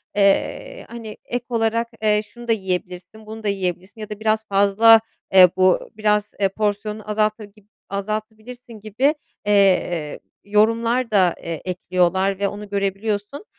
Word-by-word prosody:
eee, 200 - 0
hani, 230 -2 -9
ek 245 0 -4
olarak, 230 0 0
eee, 210 -1 +2
"Şunu 240 +3 -13
da - - +1
yiyebilirsin, 185 0 -4
bunu 220 +1 -9
da - - -2
yiyebilirsin" 190 +2 -3
ya 215 - -7
da 210 -1 -7
"Biraz 220 0 0
fazla, 205 +3 +5 0.3
eee, 185 -1 +9
bu 185 -1 +2
biraz, 210 -1 +1
eee, 195 -1 +2
porsiyonunu 210 +1 -3
azalta 215 0 0
gib 205 0 -22 0.2
azaltabilirsin" 215 +4 -6
gibi, 225 +9 0 0.3
eee, 185 -6 +2 0.2
yorumlar 230 +4 +1
da, 185 -5 +3
eee, 165 -2 -5
ekliyorlar 185 +1 0
ve 200 - +1
onu 205 +1 -7
görebiliyorsun. 205 - -3
210 Hz, 140 wpm, -21 LUFS, 195-220 Hz, 0.3 s, eee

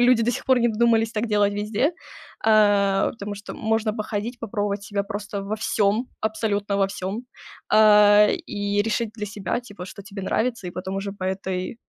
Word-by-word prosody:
люди 245 -1 +5
до 240 - +2
сих - - -5
пор 260 -1 +4
не 240 0 +3
додумались 225 0 +2
так 220 0 -1
делать 205 -2 +2
везде. 210 - 0 0.5
А, 205 -3 +4
потому 205 -3 -6
что 205 +1 -9
можно 220 -1 0
походить, 220 +2 -4
попробовать 205 -2 -2
себя 205 -1 -2
просто 205 0 -5
во 205 +2 -2
всём, 215 0 +1 0.2
абсолютно 210 -2 -1
во 195 -1 +3
всём. 195 +1 -4 0.5
А, 210 -1 +7 0.2
и 205 0 0
решить 225 +1 -1
для 210 -2 -5
себя, 205 +3 -3
типа, 205 -6 -10
что 200 +2 -10
тебе 195 0 -8
нравится. 230 +1 -1
И - - -4
потом 190 +2 -5
уже 195 0 -3
по 195 -2 -7
этой, 190 0 -3
210 Hz, 180 wpm, -24 LUFS, 200-225 Hz, 0.5 s, А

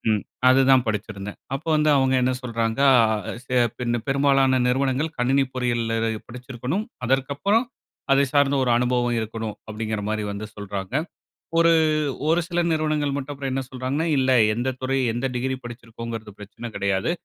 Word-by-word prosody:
ம், 105 - -2 0.3
அது 130 +1 +5
தான் 130 -2 +5
படிச்சிருந்தேன். 105 -1 -4 0.2
அப்ப 135 - -7
வந்து 150 0 +3
அவங்க 130 -1 +2
என்ன 130 +1 +2
சொல்றாங்க, 115 -1 -2 0.8
அ - - +2
பின்ன 120 -1 -1
பெரும்பாலான 135 -1 +3
நிறுவனங்கள் 135 +4 0
கணினி 135 +3 +3
பொறியியல்ல 120 -2 -1 0.4
படிச்சிருக்கணும், 125 - -4 0.2
அதற்கப்பறம் 140 - +1 0.5
அதை 140 +1 +4
சார்ந்த 140 -1 +3
ஒரு 125 - 0
அனுபவம் 120 -1 +1
இருக்கணும் 110 -1 -5
அப்டிங்குற 110 0 -3
மாரி 110 0 -1
வந்து 100 +1 -5
சொல்றாங்க. 100 0 -6 0.7
ஒரு, 170 0 +5 0.6
ஒரு 165 +2 +3
சில 175 -1 0
நிறுவனங்கள் 155 -2 0
மட்டும் 140 +1 -4
அப்புறம் 135 -1 -4
என்ன 135 - -1
சொல்றாங்கன்னா, 130 +5 -2
இல்ல 130 0 +2 0.2
எந்த 120 +3 -2
துறை 130 +1 -1 0.2
எந்த 120 +3 -1
டிகிரி 130 +2 -1
படிச்சிருக்கோம்ங்குறது 115 -2 -7
பிரச்சன 105 +3 -8
கடையாது, 100 +4 0
125 Hz, 145 wpm, -23 LUFS, 115-135 Hz, 0.8 s, அது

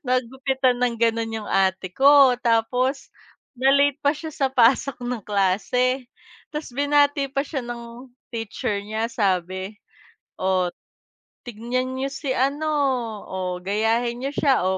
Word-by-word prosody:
nagupitan 255 0 0
ng 245 -2 +1
ganon 230 -1 0
'yung - - -9
ate 190 -1 +1
ko. 275 +2 +6
Tapos 250 +3 0 0.5
na 265 +2 +4
late 280 0 +3
pa 285 +1 +2
siya 320 +1 -7
sa 275 -2 0
pasok 255 +1 +2
ng 245 -1 -3
klase. 240 +6 +1 0.4
Tapos 300 -2 -5
binati 285 +1 +2
pa 275 +1 -1
siya 285 -2 -4
ng 240 +1 -8 0.2
teacher 215 -2 -3
niya 220 +3 -3
sabi, 190 0 -1 0.6
"O, 185 -1 +1 0.8
tignan 245 +3 -3
niyo 270 +1 -2
si 265 -3 -3
ano, 280 +4 0 0.6
o 185 -1 -4
gayahin 225 +5 0
niyo 270 - -2
siya, 275 -3 +3
o 190 0 +1
245 Hz, 135 wpm, -23 LUFS, 215-270 Hz, 0.8 s, ko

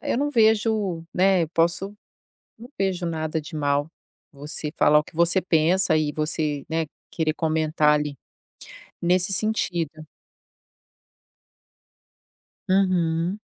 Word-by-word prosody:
eu - - -1
não 290 +1 0
vejo, 215 - +1
né, 185 -1 +3
eu 155 - -10
posso 175 +5 -1 0.6
não 240 - -11
vejo 190 -2 -1
nada 160 -1 -2
de 150 +1 -9
mal 145 0 0 0.4
você 150 +2 -5
falar 150 0 +5
o 150 - -3
que 160 - -17
você 170 +3 +3
pensa 175 0 +2
e 155 -1 +1
você, 150 -2 -2
né, 160 0 -1 0.2
querer 160 -2 -1
comentar 155 -1 +1
ali. 150 -2 -4 0.8
Nesse 180 +2 +2
sentido. 180 -6 -1 2.8
Uhum. 180 -1 +1
165 Hz, 115 wpm, -24 LUFS, 155-190 Hz, 2.8 s, falar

